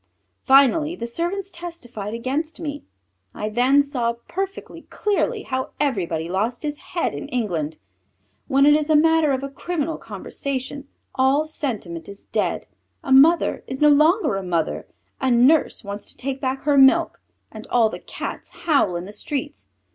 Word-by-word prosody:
Finally 280 +4 +5
the 235 - -5
servants 350 +10 -3
testified 250 - -7
against 270 +8 -3
me. 290 -3 -5 0.5
I 210 - -3
then 255 +6 +4
saw 250 -5 -1
perfectly 390 +1 -5
clearly 420 +2 -1
how 260 0 -3
everybody 180 - -1
lost 215 - -2
his 295 -1 -3
head 345 - -2
in 145 - -6
England. 170 -11 -2 0.7
When 275 +1 +4
it 295 - +7
is 300 0 +1
a 310 - +5
matter 320 -1 +4
of 265 0 -1
a - - -2
criminal 320 +3 -3
conversation, 275 0 -5 0.3
all 270 +4 +2
sentiment 210 - -4
is 200 0 -11
dead; - - -1 0.4
a 270 - -5
mother 300 +6 +5
is 265 - -5
no 300 - +6
longer 305 - +4
a - - -3
mother, 170 -3 -2 0.3
a 265 - +1
nurse 250 +4 +3
wants 200 0 -7
to - - -13
take 270 +1 -4
back 265 0 -2
her 285 -1 +3
milk, 265 0 +4 0.3
and 220 0 -10
all 235 -2 +3
the - - -7
Cats - - -7 0.2
howl 280 - +3
in 175 +1 -4
the 200 - -9
streets. 290 +6 -5
270 Hz, 160 wpm, -22 LUFS, 230-305 Hz, 0.7 s, it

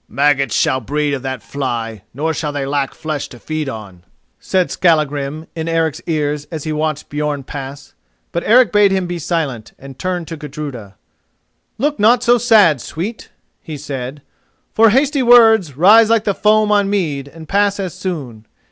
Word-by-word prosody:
"Maggots 140 -4 +1
shall 130 - +2
be 120 - -16
bred 150 0 0
of 135 - -3
that 130 -2 -5
fly, 120 -6 -4
nor 155 +5 -2
shall 150 -1 -3
they 145 -1 -3
lack 140 -1 -2
flesh 155 -2 -4
to 120 - -13
feed 155 +2 -4
on," 100 -7 -9 0.4
said 185 -2 0
Skallagrim 150 -2 0
in 160 0 -4
Eric's 165 -2 0
ears 150 -2 -1
as 160 -3 -6
he 155 - -3
watched 155 -1 -2
Björn 145 -2 -3
pass. 140 0 -8 0.4
But 170 - -2
Eric 245 +2 +5
bade 205 -1 +5
him 190 -1 0
be 175 0 -4
silent, 150 -9 -3
and 135 -1 -12
turned 180 -3 -3
to 165 - -6
Gudruda. 140 -9 -8 0.8
"Look 295 +5 -1
not 235 +4 +4
so 240 0 +4
sad, 210 - +4
sweet," 205 +8 -6 0.3
he 155 -3 -7
said, 135 -1 -6 0.5
"for 225 0 +5
hasty 275 +5 +2
words 225 - +5
rise 215 +6 +6
like 225 -2 +3
the 200 - 0
foam 215 +1 +2
on 205 -1 +2
mead 155 -9 -1
and 160 +2 -12
pass 200 +2 +1
as 185 -4 -3
soon. 130 - -6
155 Hz, 175 wpm, -17 LUFS, 140-200 Hz, 0.8 s, rise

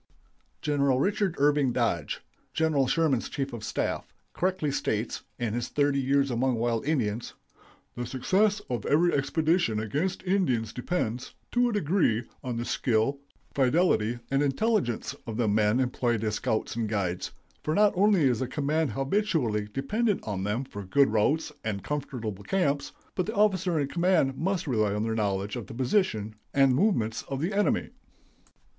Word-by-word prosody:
Gen. 145 -2 0
Richard 160 +8 +2
Irving 145 -2 +3
Dodge, 115 - -1 0.3
General 155 -4 +2
Sherman's 150 -5 +1
chief 135 -2 -3
of 115 -2 -6
staff, - - -2 0.2
correctly 185 -5 0
states, 110 -4 -2 0.2
in 120 -3 -2
his 120 0 -2
"Thirty 145 -1 +1
Years 140 +1 +2
Among 125 +2 +1
Our 115 - -2
Wild 115 +2 0
Indians": 120 -7 -1 0.6
"The 120 0 -4
success 195 - +1
of 120 -5 -3
every 170 +4 +3
expedition 155 - +1
against 150 - -2
Indians 130 - +1
depends, 125 -4 -3 0.2
to 245 0 +3
a - - -2
degree, 165 - +2 0.2
on 125 -2 -3
the 120 - -2
skill, 120 +4 +1 0.3
fidelity, 130 -5 +2
and 135 +1 +2
intelligence 145 - 0
of 110 -1 -4
the 120 -2 +1
men 105 +3 +3
employed 120 -3 0
as 110 -1 0
scouts 110 +1 -1
and 115 -2 -1
guides, 95 -4 -1 0.3
for 155 - 0
not 210 0 +5
only 195 -2 +4
is 125 -5 +3
the 130 - -1
command 150 0 0
habitually 135 - 0
dependent 205 - 0
on 100 -3 -3
them 105 +6 -1
for 110 -6 -8
good 140 +9 +3
routes 140 +9 +1
and 105 -4 -3
comfortable 130 -7 -3
camps, 145 - 0 0.2
but 185 - -1
the 220 - -3
officer 190 -5 +2
in 140 - 0
command 170 -4 +2
must 185 +5 -1
rely 110 -7 +1
on 105 - -1
their 115 0 -1
knowledge 100 -1 -1
of 120 -4 -6
the - - -9
position 125 - 0 0.2
and 135 -2 +5
movements 120 - +1
of 135 - -3
the 170 +7 -1
enemy." 205 +1 +1
135 Hz, 165 wpm, -28 LUFS, 115-165 Hz, 0.6 s, not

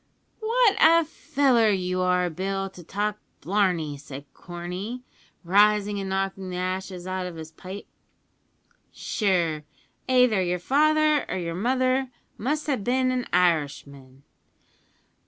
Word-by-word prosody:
"What 450 -2 +3
a 330 +1 +6
feller 275 -7 +2
you 185 -2 0
are, 180 0 +2
Bill, 195 +3 -3
to 180 - -12
talk 205 +4 -2 0.2
blarney," 180 -7 0
said 140 0 -10
Corney, 180 +8 -6 0.4
rising 205 +2 +3
and 195 -1 -4
knocking 195 0 -2
the 180 - -5
ashes 185 0 -4
out 185 0 -3
of 175 - -8
his 160 -1 -9
pipe; 190 +4 -9 1.1
"sure, 170 -7 0 0.5
aither 250 -6 +4
yer 180 0 0
father 305 - +3
or - - -2
yer 170 -2 -3
mother 255 +6 +1 0.3
must 295 +6 -2
have 265 -9 -1
bin 255 +2 +1
an 250 -1 -2
Irishman." 140 -6 -1
195 Hz, 125 wpm, -25 LUFS, 180-250 Hz, 1.1 s, a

